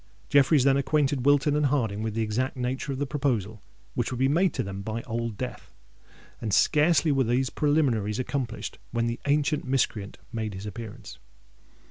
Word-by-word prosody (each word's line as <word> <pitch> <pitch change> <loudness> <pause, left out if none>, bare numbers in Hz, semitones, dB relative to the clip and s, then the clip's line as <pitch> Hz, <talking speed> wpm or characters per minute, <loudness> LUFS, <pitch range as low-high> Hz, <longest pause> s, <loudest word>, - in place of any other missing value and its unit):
Jeffreys 140 0 +5
then 135 0 +4
acquainted 140 -1 +1
Wilton 145 +1 +4
and 150 -1 +3
Harding 115 -7 0
with 110 -1 -3
the 115 - +1
exact 125 +6 -1
nature 130 +3 -2
of 135 - -3
the 145 - -1
proposal 120 -8 -1 0.3
which - - -1
would 125 - -3
be 130 +2 +3
made 170 +6 +3
to - - 0
them 100 0 -6
by 110 +3 -4
Old 115 -2 -3
Death; 125 - -6 0.7
and 110 - -2
scarcely 155 - +4
were 135 -1 +3
these 125 +2 +1
preliminaries 130 -9 +1
accomplished 130 -3 -3
when 115 -1 -1
the 115 +1 -2
ancient 145 +1 +2
miscreant 115 -6 -1 0.2
made 110 -3 -3
his 95 +2 -7
appearance. 105 +1 -8
130 Hz, 175 wpm, -27 LUFS, 110-145 Hz, 0.7 s, Jeffreys